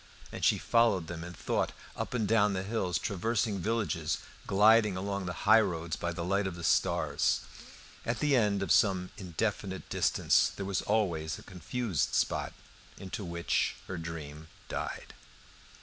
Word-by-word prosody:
And - - -7
she - - +5
followed 115 -7 +3
them 80 0 -6
in 90 +1 -7
thought - - -1 0.2
up - - -4
and 110 -4 0
down 105 -2 +3
the 95 -1 -2
hills, 95 -5 -1
traversing 105 +4 -1
villages, 100 -6 -1 0.3
gliding 105 0 +5
along 100 0 -3
the 90 - -5
highroads 95 -7 +3
by 85 - -3
the 85 0 -4
light 100 +2 +1
of 90 - -5
the 85 - -8
stars. 65 -6 +2 0.6
At 115 0 -1
the 145 +1 +2
end 105 -5 +2
of - - -2
some 95 -5 +3
indefinite 95 +1 -3
distance - - +3
there 100 - -4
was 95 -1 -1
always 85 -8 0
a - - -12
confused 95 - -2
spot, - - 0 0.4
into 95 +2 -6
which 85 -1 0
her 95 -3 -4
dream 80 -2 -7 0.2
died. - - -5
95 Hz, 155 wpm, -31 LUFS, 85-105 Hz, 0.6 s, she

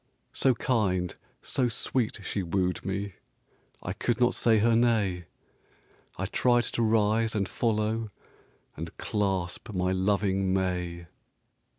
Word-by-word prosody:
So 130 -2 +3
kind, 95 -9 0 0.3
so 125 -2 +1
sweet 115 -2 -1
she 100 - -2
wooed 90 +1 -1
me, 100 +1 -3 0.7
I 90 - -3
could 120 +3 -1
not 125 0 +4
say 115 -2 +3
her 115 +2 +4
nay; 105 -7 +2 0.9
I - - -2
tried 120 -1 +2
to 120 - -2
rise 110 0 +2
and 100 -3 0
follow, 110 0 0 0.7
And 80 +2 -7
clasp 95 0 -2
my 90 0 0
loving 95 0 +1
may. 90 -2 -2
105 Hz, 120 wpm, -28 LUFS, 95-115 Hz, 0.9 s, not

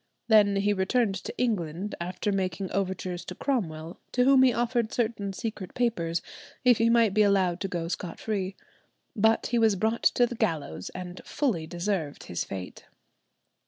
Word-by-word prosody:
Then 210 -2 +6
he 200 +1 +2
returned 200 +3 +1
to - - -6
England, 200 -5 -1
after 180 +4 -2
making 190 -1 -2
overtures 185 -2 -2
to 180 - -7
Cromwell, 170 - -2
to 250 - +3
whom 270 0 +6
he 260 -1 +6
offered 235 -1 0
certain 220 -4 -1
secret 195 -2 -5
papers 170 -9 0 0.4
if 245 -3 +6
he 230 0 +4
might 230 -4 +4
be 215 - +4
allowed 190 -4 +3
to 195 - -1
go 170 -3 -3
scot 170 0 -5
free. 195 -3 -2 0.6
But 220 +1 +3
he 240 - +1
was 220 -3 +4
brought 220 +4 0
to 245 - +4
the 240 - -5
gallows, 150 - -2
and 180 0 -7
fully 215 - -1
deserved 175 -3 -2
his 85 - -3
fate. 95 -2 -7
200 Hz, 165 wpm, -27 LUFS, 175-230 Hz, 0.6 s, Then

